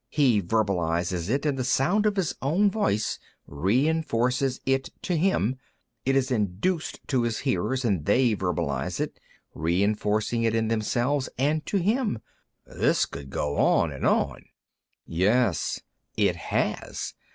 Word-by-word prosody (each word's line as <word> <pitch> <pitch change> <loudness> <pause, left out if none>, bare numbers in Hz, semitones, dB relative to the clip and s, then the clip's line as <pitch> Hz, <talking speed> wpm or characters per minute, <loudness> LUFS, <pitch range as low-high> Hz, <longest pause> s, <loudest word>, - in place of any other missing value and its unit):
He 130 -9 +3
verbalizes 90 -3 0
it, 140 +5 0
and 140 -3 0
the - - 0
sound 175 +12 +2
of 210 - +1
his 190 -6 0
own 185 +9 +2
voice 150 - 0 0.3
re 100 - +1
enforces 130 -4 0
it 135 0 +1 0.2
in 175 - +1
him. 145 - +1 0.5
It 135 - +3
is 135 0 +1
induced 110 - -1
in 125 -2 +3
his 115 -2 -1
hearers, 125 +8 0
and 95 -9 +1
they 120 +3 +3
verbalize 85 -8 -2
it, - - -3 0.3
re 85 +5 +1
enforcing 105 +2 0
it 115 -1 +1
in 110 -1 +1
themselves 120 +5 0
and 150 +4 +1
in 200 - +2
him. 220 - +1 0.5
This - - +1
could 70 0 -9
go 70 +1 -2
on - - +3
and - - -2
on." - - 0 0.6
"Yes. 100 +3 +1 0.4
It - - +3
has. - - -2
120 Hz, 145 wpm, -26 LUFS, 100-140 Hz, 0.6 s, He